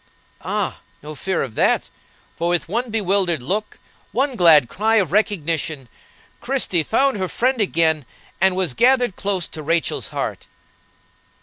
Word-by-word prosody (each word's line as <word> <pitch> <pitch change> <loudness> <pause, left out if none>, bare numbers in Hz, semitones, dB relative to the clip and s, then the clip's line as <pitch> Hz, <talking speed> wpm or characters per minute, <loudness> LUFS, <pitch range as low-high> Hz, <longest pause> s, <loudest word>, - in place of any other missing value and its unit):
Ah! - - -2 0.2
no 155 +1 -7
fear 185 +4 -2
of 125 - -6
that; - - +1 0.4
for 170 +1 -1
with 175 -1 0
one 235 +7 -2
bewildered 195 - 0
look, 205 +10 -3 0.3
one 265 +2 0
glad 160 - +6
cry 220 - 0
of 190 -8 +2
recognition, 165 - -1 0.5
Christie 240 -9 0
found 265 - +1
her 190 -1 -1
friend 250 +4 0
again, 160 -7 +1 0.3
and 190 -1 +3
was 185 -7 0
gathered 245 - +3
close 195 -4 -1
to 155 - -7
Rachel's 165 +2 0
heart. - - -5
190 Hz, 140 wpm, -21 LUFS, 160-220 Hz, 0.5 s, glad